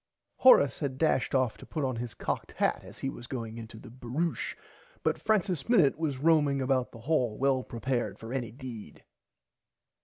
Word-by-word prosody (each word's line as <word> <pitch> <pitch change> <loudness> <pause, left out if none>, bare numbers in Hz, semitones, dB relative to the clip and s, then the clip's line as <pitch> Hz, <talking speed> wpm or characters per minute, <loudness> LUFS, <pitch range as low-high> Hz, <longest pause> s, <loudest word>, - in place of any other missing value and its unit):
Horace 145 - +6
had 140 -4 -3
dashed 145 -3 +1
off 130 -4 +1
to - - -11
put 155 - -3
on 130 -3 -2
his 120 -1 -5
cocked - - -3
hat - - 0
as - - -12
he - - -3
was 120 - -10
going 115 -3 -5
in 115 - -7
the 110 +1 -12
baroushe 130 +7 -3 0.5
but - - 0
Francis 190 -5 0
Minnit 185 - +5
was 155 -4 -2
roaming 145 -1 +3
about 130 -1 +1
the 115 - -12
hall 125 -5 +1
well 135 -1 +2
prepared 120 +1 -2
for 115 +2 -7
any 125 -4 -2
deed. 120 - -9
130 Hz, 180 wpm, -29 LUFS, 120-150 Hz, 0.5 s, Horace